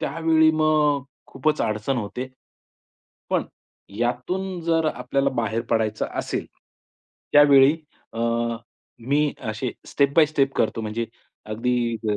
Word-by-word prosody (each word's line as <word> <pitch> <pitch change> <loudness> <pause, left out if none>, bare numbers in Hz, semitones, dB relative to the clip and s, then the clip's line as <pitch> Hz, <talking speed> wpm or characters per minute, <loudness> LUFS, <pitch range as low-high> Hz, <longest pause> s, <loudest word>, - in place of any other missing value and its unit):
त्यावेळी 160 -1 +3
मग 155 -2 +2 0.2
खूपच 150 +3 -1
अडचण 110 +5 -1
होते. 125 +4 -5 1.0
पण - - +1 0.5
यातून 175 +11 -2
जर 165 -1 +1
आपल्याला 140 0 0
बाहेर 115 -1 0
पडायचं 110 -2 0
असेल, - - -3 0.9
त्यावेळी 145 0 +7 0.4
अ, - - -7 0.9
मी 145 +1 +2 0.2
असे 120 +3 -3 0.2
स्टेप 140 -1 +1
बाय 160 -2 +7
स्टेप 135 -3 0
करतो 115 - 0
म्हणजे 110 +2 -2 0.4
अगदी 115 +2 -1
ग 105 -1 +1
135 Hz, 115 wpm, -23 LUFS, 115-155 Hz, 1.0 s, त्यावेळी